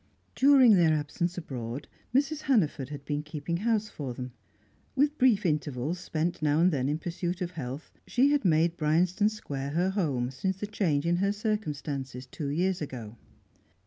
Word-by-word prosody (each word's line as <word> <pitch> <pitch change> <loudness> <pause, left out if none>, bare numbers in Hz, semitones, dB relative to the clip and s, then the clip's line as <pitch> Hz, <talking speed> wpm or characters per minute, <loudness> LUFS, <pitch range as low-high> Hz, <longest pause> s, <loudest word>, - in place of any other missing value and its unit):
During 265 -4 +6
their 165 -3 +4
absence 170 +4 -2
abroad, 130 -5 -5 0.2
Mrs. 285 +4 +1
Hannaford 160 - +1
had 145 -2 -8
been 145 0 -1
keeping 150 +2 -4
house 215 +1 +1
for 135 - -6
them. 125 0 -6 0.6
With 290 +2 +2
brief 230 -6 +4
intervals 150 0 -1
spent 165 0 -2
now 150 0 +2
and 180 +2 +5
then 135 -3 0
in 150 - 0
pursuit 175 +2 -3
of 180 -2 -3
health, 140 -3 -6 0.2
she 270 +3 +3
had 290 -3 +2
made 170 -1 +3
Bryanston 175 +7 +2
Square 140 -10 -5
her 180 +4 +1
home 140 -11 -1
since 190 +8 -2
the 210 - -3
change 170 -8 0
in 170 +1 +2
her 200 +2 +2
circumstances 150 - -3
two 145 +3 -6
years 180 +5 0
ago. 120 -6 -6
165 Hz, 170 wpm, -29 LUFS, 145-200 Hz, 0.6 s, During